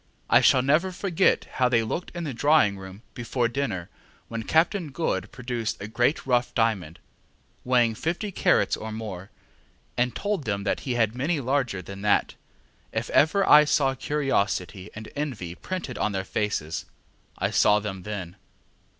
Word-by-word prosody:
I - - +7
shall 130 - +5
never 155 +7 +2
forget 185 0 +1
how 125 -1 0
they 115 -2 +3
looked 165 +11 -3
in 175 - -3
the 145 -5 -3
drawing 145 -5 +3
room 95 +3 -11
before 120 0 -1
dinner 115 -9 -3 0.4
when 115 -1 -4
Captain 160 - +1
Good 105 - -2
produced 120 -4 -4
a 100 - -6
great 120 +7 0
rough 125 -2 +1
diamond, 100 -9 0 0.7
weighing 120 -2 +3
fifty 170 - -3
carats - - +2
or 110 0 -7
more, 105 -4 -6 0.7
and 125 0 0
told 205 -8 -2
them 100 -2 -2
that 100 - 0
he 125 - 0
had 110 -2 +2
many 145 +6 -1
larger 125 -7 -1
than 100 +3 -9
that. 105 0 +2 0.6
If - - -3
ever 190 +7 +3
I 150 0 +9
saw 145 -3 +2
curiosity 105 -9 -1
and 110 0 -8
envy 125 - -4
printed 175 - -5
on 105 - 0
fair 95 -1 -2
faces, 95 -7 -2 0.5
I - - -1
saw 105 0 +4
them 100 -3 -5
then. 95 -2 -6
120 Hz, 160 wpm, -26 LUFS, 105-145 Hz, 0.7 s, I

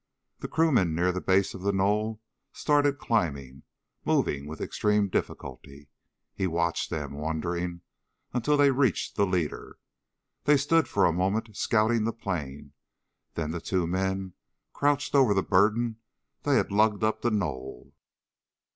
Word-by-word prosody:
The - - -5
crewmen 125 - +2
near 90 +2 +2
the 90 0 -4
base 95 0 +2
of 95 - -8
the 100 +1 +1
knoll 105 +3 0 0.3
started 145 -1 +2
climbing, 70 - -2 0.4
moving 70 0 0
with 80 0 -8
extreme 105 -1 +1
difficulty. 70 -5 -5 0.4
He 95 - -1
watched 85 0 -1
them, 75 -3 -4
wondering, 85 +3 -3 0.5
until 130 +5 +1
they 145 -1 +5
reached 130 -6 0
the 100 - +2
leader. 90 -5 -3 0.7
They 145 0 +5
stood 160 +4 +2
for 100 - +2
a 85 - +3
moment 100 +5 -1
scouting 110 +1 +2
the 115 - -1
plain, 75 -9 -5 0.6
then 80 -2 -2
two - - -5 0.2
of 90 - +3
the 85 - -2
men 95 0 -2 0.4
crouched 145 0 0
over 130 -7 +5
the 95 - +2
burden 110 +4 +2 0.4
they - - +2
had - - +1
lugged 105 +1 +2
up 110 0 0
the 120 - +1
knoll. 70 - -4
95 Hz, 145 wpm, -27 LUFS, 85-115 Hz, 0.7 s, they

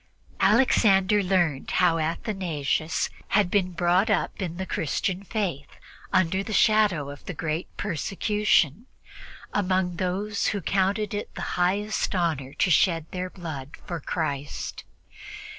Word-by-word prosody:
Alexander 205 -2 +4
learned 175 -7 +1
how 170 -2 +3
Athanasius 160 -3 -1 0.3
had 200 -4 +2
been 185 -3 +2
brought 180 +4 +2
up 210 - 0
in 175 -2 -3
the 190 - -3
Christian 185 +3 -1
Faith 180 -10 -3 0.4
under 185 +1 +2
the 210 - -6
shadow 205 -11 +3
of 145 - -11
the 180 - -5
great 155 +3 -2
persecution, 205 - +1 0.7
among 185 -3 0
those 195 +3 -1
who 205 - 0
counted 195 +4 0
it 205 - -5
the - - -4
highest 200 +4 0
honor 155 -7 -1
to 180 - +1
shed 165 -2 +3
their 185 0 -3
blood 155 -7 -7
for 170 -1 -4
Christ. 145 -2 -4
185 Hz, 125 wpm, -26 LUFS, 165-200 Hz, 0.7 s, Alexander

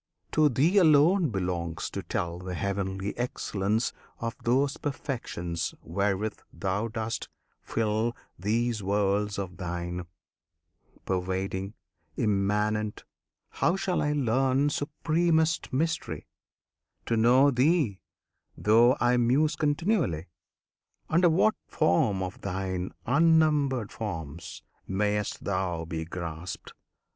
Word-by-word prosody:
To 155 -1 +4
Thee 155 - +3
alone 160 +1 +5
Belongs 90 -5 -2
to - - -4
tell 85 0 -3
the 90 0 -5
heavenly 100 +1 -2
excellence 110 -2 -1 0.3
Of 115 0 -3
those 135 +4 +2
perfections 100 - -3
wherewith 100 +4 -1
Thou 100 +3 -1
dost 110 0 -4 0.3
fill 110 +1 -1 0.2
These 115 +3 0
worlds 100 +1 +1
of 95 -2 -5
Thine; 90 -1 -4 1.0
Pervading, 95 +2 -2 0.4
Immanent! 105 +1 0 0.5
How 170 - +1
shall 190 -2 0
I 150 0 +1
learn, 135 +1 +2
Supremest 160 +2 +1
Mystery! 160 +5 -1 0.8
To 115 - +1
know 125 +5 +5
Thee, 135 - +2 0.6
though 120 +5 +5
I 120 0 +3
muse 135 +6 +3
continually? 150 - 0 0.8
Under 170 +2 +5
what 190 +7 +4
form 95 +3 +2
of 90 0 -6
Thine 95 -1 -3
unnumbered 145 -4 +3
forms 80 -7 -6 0.2
Mayst 105 +1 -1
Thou 90 -4 -1
be 80 0 -4
grasped? 85 0 -6
110 Hz, 100 wpm, -28 LUFS, 95-140 Hz, 1.0 s, alone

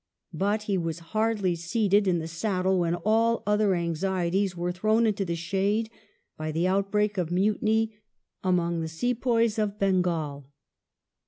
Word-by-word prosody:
But 205 +5 0
he 200 -3 0
was 165 -1 -3 0.2
hardly 215 -5 +1
seated 200 +4 +1
in 180 -2 +3
the 160 -1 -4
saddle 185 +2 0
when 170 -1 +1
all 225 +6 +1
other 210 -1 +2
anxieties 180 +2 -1
were 175 +1 -1
thrown 215 +5 +2
into 210 -2 +1
the 170 -2 -2
shade 200 +6 -1 0.4
by 155 0 -4
the 165 +3 0
outbreak 200 +2 +1
of 170 -3 -1
mutiny 215 +4 +1 0.5
among 170 -2 +1
the 160 - -3
sepoys 230 +5 0
of 210 -1 -1
Bengal. 170 -8 0
190 Hz, 145 wpm, -27 LUFS, 170-215 Hz, 0.5 s, in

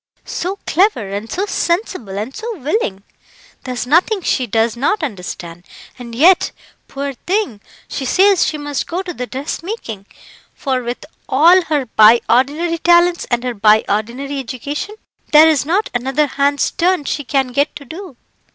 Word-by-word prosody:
"So 370 +3 -3
clever, 335 - +1
and 205 +3 -5
so 390 - -1
sensible, 340 - -2
and 220 +6 -5
so 445 -1 -5
willing! 265 - -2 0.6
There's 250 -1 -3
nothing 360 - +2
she 255 -5 0
does 225 +1 +1
not 295 - 0
understand, 180 - -6 0.4
and 235 -2 -8
yet, 345 +8 +4 0.4
poor 280 0 -4
thing, 360 - -2 0.3
she 275 - -4
says 380 +8 +4
she 310 - -2
must 290 -1 -3
go 360 +3 -3
to 360 -2 -6
the 250 -4 -5
dressmaking, 265 - -6 0.5
for 260 -3 -1
with 240 +4 -5 0.2
all 335 +8 +6
her 295 -4 0
by 220 0 +6
ordinary 300 +8 +1
talents 345 0 +3
and 240 0 0
her 250 -1 -2
by 215 0 +4
ordinary 245 +7 -2
education, 280 - -5 0.4
there 305 +1 +9
is 295 -3 +2
not 390 +6 0
another 265 +5 +1
hand's 285 0 0
turn 355 -3 +1
she 290 - -2
can 270 -1 0
get 280 +4 0
to 285 - -9
do. 325 -1 -9
280 Hz, 160 wpm, -17 LUFS, 240-345 Hz, 0.6 s, there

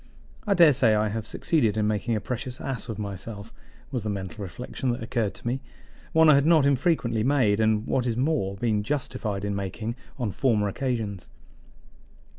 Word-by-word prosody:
"I 200 - +3
daresay 135 - +6
I 105 0 +1
have 110 +1 -4
succeeded 115 -9 +1
in 105 - +2
making 110 +2 0
a - - 0
precious 125 +3 -5
ass 125 -3 -3
of 110 - -4
myself," 100 +1 -6 0.4
was 125 -6 -2
the 105 - -2
mental 95 -2 -5
reflection 125 +6 -4
that 120 - -5
occurred 110 -4 -1
to - - -12
me 125 +3 -1 0.5
one 160 -1 +5
I 155 - +8
had 140 0 +4
not 160 -4 +5
infrequently 130 -5 +1
made, 125 -6 +3
and, 110 0 +2
what 125 -1 0
is 115 -1 -1
more, 130 -8 0
been 105 0 0
justified 105 -5 -2
in 100 0 -1
making 105 +4 -4 0.2
on 120 -6 -2
former 110 -3 +1
occasions. 110 -4 -3
115 Hz, 180 wpm, -26 LUFS, 105-130 Hz, 0.5 s, I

